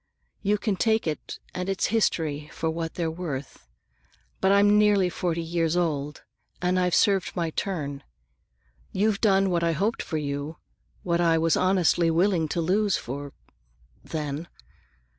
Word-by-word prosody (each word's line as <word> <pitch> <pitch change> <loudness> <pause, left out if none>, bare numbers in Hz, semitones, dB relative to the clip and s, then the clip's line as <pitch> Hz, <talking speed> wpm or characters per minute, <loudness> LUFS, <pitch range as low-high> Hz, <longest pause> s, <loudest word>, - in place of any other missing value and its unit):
You 210 0 +2
can 205 -2 -1
take 220 +1 +2
it 155 -2 -4 0.2
and 180 +1 -3
its 195 - 0
history 155 -9 0
for 160 - -2
what 165 0 -4
they're 165 -2 -1
worth. 145 - -6 0.7
But 190 - +3
I'm 205 +1 +5
nearly 205 -3 +4
forty 170 -1 -2
years 165 0 0
old, 150 -4 -1 0.4
and 180 +1 +1
I've 180 -1 +2
served 200 -3 +2
my 170 -3 -1
turn. 145 -7 -3 0.9
You've 205 +1 +1
done 195 -3 +3
what 170 -1 +1
I 165 0 +2
hoped 205 +8 0
for 160 - -3
you, 145 +1 -4 0.5
what 170 -1 +1
I 165 -1 +4
was 165 0 +2
honestly 180 -2 +3
willing 170 0 +2
to 170 - -1
lose 195 +3 +2
you - - -3 1.1
for—then. 150 +1 -3
170 Hz, 150 wpm, -26 LUFS, 160-195 Hz, 1.1 s, I'm